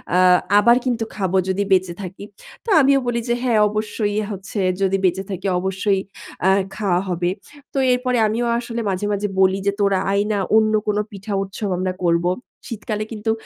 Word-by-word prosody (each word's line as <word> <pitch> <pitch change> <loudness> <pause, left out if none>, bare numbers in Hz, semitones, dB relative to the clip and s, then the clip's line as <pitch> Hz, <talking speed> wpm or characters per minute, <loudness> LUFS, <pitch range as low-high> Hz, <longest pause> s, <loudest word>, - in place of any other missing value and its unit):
আ 180 - +4 0.4
আবার 235 +3 +5
কিন্তু 235 -3 0
খাবো 190 -2 0
যদি 195 +2 0
বেঁচে 185 -2 +3
থাকি।" 190 +1 -8 0.4
তো 465 - -5
আমিও 275 0 +4
বলি 235 -1 0
যে - - +3
"হ্যাঁ 235 -4 +2
অবশ্যই 210 0 -2 0.2
হচ্ছে 195 +1 -6 0.2
যদি 195 0 +2
বেঁচে 190 +2 +1
থাকি 195 +1 -4
অবশ্যই 190 +1 0 0.4
অ্যা 190 - +4 0.3
খাওয়া 185 -4 +1
হবে।" 175 0 0 0.4
তো - - -4
এরপরে 250 0 +1
আমিও 235 +3 -1
আসলে 235 -1 -4
মাঝে, 190 +1 -2
মাঝে 205 0 -1
বলি 190 0 +4
যে 200 - +3
"তোরা 200 -2 +2
আয় 200 +1 +2
না। 205 - 0 0.2
অন্য 215 0 +3
কোন 210 0 +1
পিঠা 200 +1 -6
উৎসব 195 +1 -5
আমরা 185 0 -1
করব।" 170 0 +2 0.4
শীতকালে 215 -1 -4
কিন্তু 220 +1 -1
200 Hz, 180 wpm, -21 LUFS, 190-220 Hz, 0.4 s, আবার